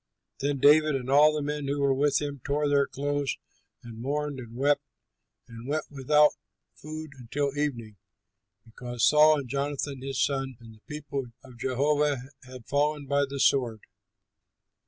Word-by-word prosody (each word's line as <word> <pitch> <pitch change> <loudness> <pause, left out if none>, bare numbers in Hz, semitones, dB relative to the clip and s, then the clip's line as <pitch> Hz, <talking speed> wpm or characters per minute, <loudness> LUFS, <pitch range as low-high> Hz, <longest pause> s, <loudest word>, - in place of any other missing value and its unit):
Then 140 +1 -1
David 150 +2 +5
and 130 0 -3
all 150 +2 +7
the 150 -1 -2
men 145 -1 -3
who 140 +1 -1
were 140 -1 +3
with 140 +1 +2
him 145 -2 -5
tore 145 +1 0
their 140 -1 +3
clothes 145 0 -2 0.5
and 115 -1 -10
mourned 145 +1 -2
and 120 -2 -10
wept 145 +3 +2 0.7
and 115 0 -10
went 155 +2 -1
without 150 +2 +4 0.4
food 155 0 -8
until 140 +4 -2
evening, 120 -8 -3 0.7
because 120 +1 -2
Saul 155 +1 +6
and 140 -3 -5
Jonathan 140 0 -3
his 135 -1 -4
son 135 -2 -1
and 115 -1 -13
the 110 - -20
people 145 -3 -5 0.2
of 125 -3 -15
Jehovah 145 +3 +1 0.3
had 125 -2 -12
fallen 145 +1 0
by 140 +1 +1
the 140 0 -5
sword. 120 -6 +2
140 Hz, 155 wpm, -27 LUFS, 130-145 Hz, 0.7 s, all